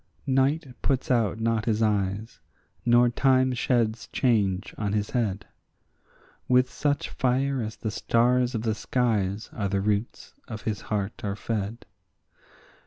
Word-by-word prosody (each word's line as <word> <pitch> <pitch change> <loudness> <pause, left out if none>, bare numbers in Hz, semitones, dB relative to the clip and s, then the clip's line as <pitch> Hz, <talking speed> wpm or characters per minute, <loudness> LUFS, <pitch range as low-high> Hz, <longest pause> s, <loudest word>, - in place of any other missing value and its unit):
Night 140 +4 +2 0.2
puts 135 -2 0
out 115 -3 +1
not 115 -1 0
his 110 -1 +1
eyes, 105 0 -1 0.5
nor 120 0 +6
time 130 +1 +3
sheds 115 -3 0
change 100 -7 +1
on 105 -2 -2
his 105 -1 -1
head; 105 -6 -1 1.0
With 125 0 +3
such 145 -1 -1
fire 130 +1 0
as 110 -1 -4
the 110 - -4
stars 125 +3 +2
of 110 - -2
the 110 -2 +1
skies 110 -3 -1
are 100 -4 -2
the 100 0 0
roots 105 +3 -2
of 110 -3 -7
his 105 -3 -2
heart 105 -1 -2
are 100 -1 -2
fed. 110 +1 -4
115 Hz, 140 wpm, -26 LUFS, 105-125 Hz, 1.0 s, nor